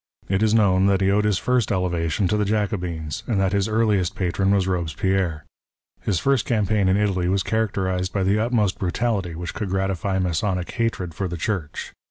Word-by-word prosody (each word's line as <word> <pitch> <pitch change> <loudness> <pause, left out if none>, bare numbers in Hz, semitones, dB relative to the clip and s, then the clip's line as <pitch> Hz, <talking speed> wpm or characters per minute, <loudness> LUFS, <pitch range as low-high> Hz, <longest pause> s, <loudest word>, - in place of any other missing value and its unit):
It 95 +1 0
is 110 0 +3
known 95 -3 +4
that 100 -1 +2
he 95 0 +3
owed 105 +1 +2
his 105 -3 +2
first 125 -3 +1
elevation 90 -1 0
to 105 - +1
the 105 - +1
Jacobins, 90 -7 -2
and 110 -5 +1
that 95 -1 +2
his 100 0 +1
earliest 105 -5 +1
patron 95 +1 0
was 100 -2 +2
Robespierre. 90 -1 -1 0.6
His 100 - 0
first 135 +5 +2
campaign 105 -4 +1
in 95 - +3
Italy 95 -4 +1
was 95 0 +1
characterized 95 -4 -1
by 100 - 0
tlie 100 +3 +2
utmost 110 -4 +1
brutality 95 -2 -1
which 85 +1 -5
cou.ld 105 - -4
gratify 95 0 -1
Masonic 90 0 -1
hatred 115 -8 -2
for 95 +4 -3
the 85 -1 -5
Church. 85 -3 -3
95 Hz, 190 wpm, -23 LUFS, 90-105 Hz, 0.6 s, known